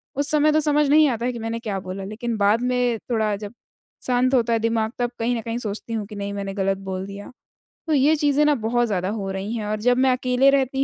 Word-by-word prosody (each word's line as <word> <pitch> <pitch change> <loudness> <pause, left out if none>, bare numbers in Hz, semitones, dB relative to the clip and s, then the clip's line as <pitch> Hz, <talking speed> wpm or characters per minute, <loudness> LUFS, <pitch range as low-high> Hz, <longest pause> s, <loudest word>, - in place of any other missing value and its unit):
उस 285 +1 0
समय 305 0 +4
तो 310 - +3
समझ 295 -1 +2
नहीं 305 0 +6
आता 235 0 -2
है 250 - 0
कि 235 - -6
मैंने 225 +1 -3
क्या 205 -4 -3
बोला 190 +1 -6
लेकिन 230 +3 -4
बाद 205 +3 +3
में 250 -2 +1
थोड़ा 215 -2 +1
जब 205 +2 -8 0.5
शांत 255 +1 +2
होता 235 -1 +2
है 225 - +2
दिमाग 225 0 0
तब 240 0 0
कहीं 240 +2 0
न - - -3
कहीं 230 +1 -4
सोचती 220 0 -5
हूँ 215 -2 -2
कि 210 - -10
नहीं 200 0 -4
मैंने 200 -1 -4
गलत 195 -1 0
बोल 190 0 -3
दिया। 200 +3 -9 0.6
तो 315 - +1
ये 290 +3 +4
चीज़ें 290 0 +2
ना 295 -1 +4
बहुत 240 +1 0
ज़्यादा 190 -2 -1
हो 200 -3 -3
रही 195 +4 -4
हैं 215 -2 -3
और 210 0 -2
जब 245 +1 +3
मैं 260 0 +4
अकेले 255 +1 +3
रहती 270 0 +1
230 Hz, 255 wpm, -23 LUFS, 210-255 Hz, 0.6 s, नहीं